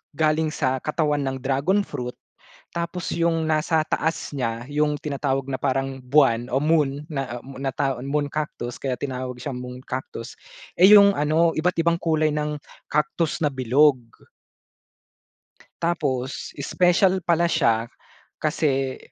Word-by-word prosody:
galing 155 +1 +2
sa 130 -2 0
katawan 150 -2 0
ng 135 0 -2
Dragon 140 +10 +2
Fruit 125 0 -5 0.6
tapos 170 +1 -3
yung 165 -1 +1
nasa 155 +1 +2
taas 160 +1 -1
niya 115 -2 -2
yung 150 0 +1
tinatawag 135 -2 -1
na 135 - -1
parang 135 0 -1
buwan 125 -3 +3
o 135 - +3
moon 150 -2 +1
na, 135 -5 -3
ah, - - -16
moon 135 0 -10
na 135 - 0
tawa 135 -3 -1
Moon 145 +1 0
Cactus 140 -5 -4
kaya 130 -2 -1
tinawag 130 -2 -4
siyang 135 0 -4
Moon 125 0 -7
Cactus 125 -2 -6 0.4
eh, 185 +3 +7
yung 200 -1 +8
ano 160 +3 +2
iba't 180 +3 +1
ibang 170 0 +2
kulay 155 -2 +1
ng 150 0 -1 0.4
Cactus 150 +2 0
na - - +4
bilog. 130 +3 +4 1.9
Tapos 135 -6 -2
special 180 +5 +3
pala 170 0 +3
siya 115 -8 +2 0.5
kasi, 135 -4 0
145 Hz, 140 wpm, -23 LUFS, 130-160 Hz, 1.9 s, yung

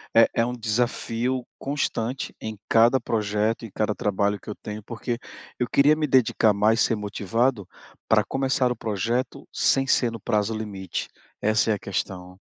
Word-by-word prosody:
é 115 0 +7
é 115 - +2
um 125 - -3
desafio 120 +2 -1
constante 135 -3 -2
em 110 -1 -6
cada 115 +3 +5
projeto, 110 0 0
em 110 - -10
cada 105 0 0
trabalho 100 0 0
que - - -12
eu 105 - -4
tenho, 105 0 -6
porque 120 +2 -4 0.4
eu 125 - +1
queria 145 +2 +5
me 155 -1 -1
dedicar 120 -4 +4
mais, 105 +3 +3
ser 115 - +3
motivado 105 +1 -1 0.4
pra - - +4
começar 135 -1 +1
o - - -1
projeto 115 +4 -2
sem 135 0 +2
ser 120 -2 +3
no 115 - -7
prazo 105 +2 0
limite, 100 -4 -4 0.3
essa 110 +1 +2
é - - +4
a 105 - -3
questão. 90 -1 -5
115 Hz, 170 wpm, -25 LUFS, 105-125 Hz, 0.4 s, é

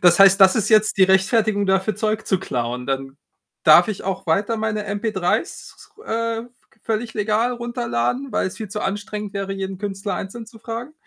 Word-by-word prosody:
das 175 -1 +5
heißt, 195 0 +7
das 190 -1 +7
ist 210 -1 +1
jetzt 215 -1 +4
die 195 - +6
Rechtfertigung 200 +2 +2
dafür, 190 +2 +1
Zeug 215 0 -1
zu 190 - +1
klauen? 125 -7 -3
Dann 135 0 -3 0.5
darf 160 +4 +7
ich 215 - -4
auch 190 -1 -4
weiter 200 +8 +1
meine 215 -1 -2
mp3's, 200 -3 0
s - - -12
s - - -17
ru 430 - -16
äh, 230 0 -2
v - - -19 0.2
g 215 - -31
völlig 225 +1 -3
legal 215 +3 +1
runterladen, 240 - -2
weil's 185 - -1
viel 220 -2 -6
zu 210 +2 -5
anstrengend 205 +1 -4
wäre, 195 0 -3
jeden 195 -1 -5
Künstler 195 -1 -4
einzeln 220 +5 -6
zu 225 0 -15
fragen? 230 +5 -6
205 Hz, 200 wpm, -21 LUFS, 190-225 Hz, 0.5 s, heißt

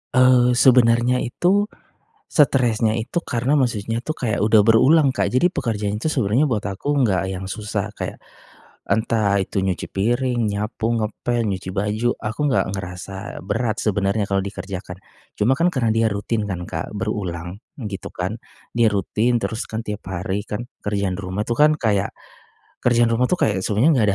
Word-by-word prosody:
Eee, 125 -1 +5
sebenarnya 120 0 +4
itu, 185 - +1 0.6
stresnya 120 -6 +2
itu 145 +10 -2
karena 125 0 -1
maksudnya 115 -4 0
itu 155 - -3
kayak 110 -6 -1
udah 110 0 +5
berulang, 135 +5 +5
Kak, - - 0
jadi 175 +9 +2
pekerjaan 105 -2 -2
itu 160 - 0
sebenarnya 130 +2 +1
buat 105 -4 -1
aku 100 +9 -2
enggak 95 -8 +1
yang 95 0 -5
susah 105 +1 -4
kayak, - - -5 0.7
entah 110 -3 +1
itu 95 0 -1
nyuci 95 -2 -2
piring, 120 +4 0
nyapu, 105 +2 -2
ngepel, 115 +2 -1
nyuci 95 -2 -3
baju, 105 +5 0
aku 105 +4 -5
nggak - - +2
ngerasa 95 +1 -7
berat 110 0 -1
sebenarnya 100 0 0
kalau 95 -1 0
dikerjakan. 95 -2 -6 0.4
Cuma 120 +6 +3
kan, 170 +5 +2
karena 120 -4 0
dia 115 0 +3
rutin 105 +2 -2
kan 90 -4 -4
Kak, 80 -1 -5
berulang, 95 -4 -4 0.2
gitu 105 -5 -6
kan, 90 +4 -3 0.4
dia 115 -2 +4
rutin, 110 +5 +1
terus 110 0 -3
kan 110 - -5
tiap 105 0 -4
hari 95 +3 -2
kan, 105 +3 -5 0.2
kerjaan 100 -3 -1
di 100 - -6
rumah 95 +3 -3
itu 120 - 0
kan 150 +4 +5
kayak, 100 -4 +1 0.7
kerjaan 120 -1 +3
rumah 125 +2 +2
itu - - +2
kayak 105 - +1
sebenarnya 105 +9 +2
enggak 120 -8 +3
110 Hz, 165 wpm, -21 LUFS, 100-120 Hz, 0.7 s, Eee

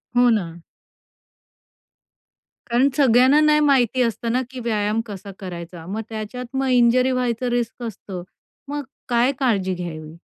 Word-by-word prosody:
हो, 245 0 +5
ना. 175 -7 -1 2.1
कारण 245 +3 +3
सगळ्यांना 260 +1 +5
नाही 300 0 +4
माहिती 265 -4 +3
असतं 230 0 -1
ना, 250 +2 +1
की 260 0 -8
व्यायाम 220 -2 0
कसा 200 -2 -8
करायचा. 175 -3 -8
मग 205 +5 -4
त्याच्यात 235 +4 -6
मग 270 0 0
इंज्युरी 250 +1 +4
व्हायचं 250 -1 -1
रिस्क 240 0 -2
असतं. 195 -5 -7 0.5
मग 290 0 -3 0.3
काय 240 +2 +3
काळजी 200 -8 +1
घ्यावी? 160 -3 -7
235 Hz, 135 wpm, -22 LUFS, 200-255 Hz, 2.1 s, हो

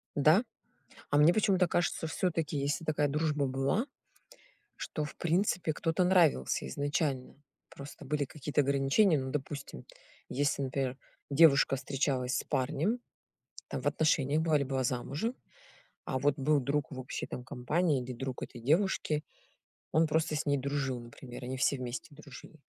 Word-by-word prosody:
Да? 155 - +5 0.7
А 145 - +2
мне 155 +4 +6
почему-то 190 -3 +3
кажется, 175 -1 0
всё-таки, 165 -3 -1
если 145 +4 -1
такая 150 -2 +1
дружба 150 0 0
была, 135 - 0 0.9
что, 150 - -4
в 150 - -9
принципе, 170 -1 +1
кто-то 165 +3 0
нравился 170 - +3
изначально. 140 - -2 0.3
Просто 140 +1 -10
были 145 +1 0
какие-то 145 +1 -1
ограничения. 140 +6 +3
Ну, 130 0 -4
допустим, 140 - -5 0.4
если, 140 0 0
например, 130 -1 -2 0.3
девушка 140 -2 +5
встречалась 130 -1 -1
с - - -2
парнем, 155 - 0 0.7
там, - - -4
в - - -1
отношениях 155 -1 +2
была, 160 -2 +3
или 140 - 0
была 130 -1 -1
замужем, 140 - -2 0.7
а 130 - -2
вот 145 +1 +1
был 145 +2 +3
друг 140 +3 -1
в 130 - -7
общей, 130 - -5
там, 125 - -7
компании 145 +2 0
или 125 +1 -6
друг 130 0 -5
этой 120 - -7
девушки, 155 - +1 0.7
он 160 +1 +4
просто 160 0 +1
с 150 - -2
ней 145 -1 +2
дружил, 135 -2 -2
например, 120 +1 -10
они 130 +1 -4
все 135 +1 +2
вместе 125 +3 -6
дружили. 145 +1 -12
145 Hz, 150 wpm, -31 LUFS, 130-160 Hz, 0.9 s, мне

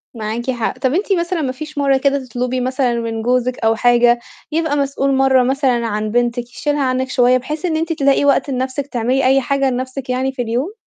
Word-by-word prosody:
معاكِ 230 +4 -3
حق. 235 -3 -3
طَب 260 +1 0
أنتِ 390 +2 +1
مثلًا 340 -1 -1
ما 265 -3 -1
فيش 305 +3 -9
مرّه 275 -1 +3
كده 275 0 0
تطلُبي 250 +1 -2
مثلًا 255 -1 0
من 225 -1 -3
جوزِك 250 +1 0
أو 225 0 +2
حاجة، 240 0 +4 0.3
يبقى 320 -2 0
مسؤول 275 -1 0
مرّة 265 -1 +4
مثلًا 255 -3 +1
عن 215 0 -2
بنتِك 240 +1 0
يشيلها 290 -1 -1
عنِّك 260 0 -1
شوية، 250 0 +3
بحيث 300 +7 -5
إن 320 -2 0
أنتِ 330 +1 -1
تلاقي 280 -1 +2
وقت 280 +1 +2
لنَفْسِك 260 +2 -2
تعملي 255 +1 0
أي 270 +1 +4
حاجة 275 +1 0
لنَفْسِك 255 +1 -4
يعني 260 +1 0
في 260 -2 -4
اليوم؟ 245 - -2
260 Hz, 205 wpm, -18 LUFS, 245-280 Hz, 0.3 s, حاجة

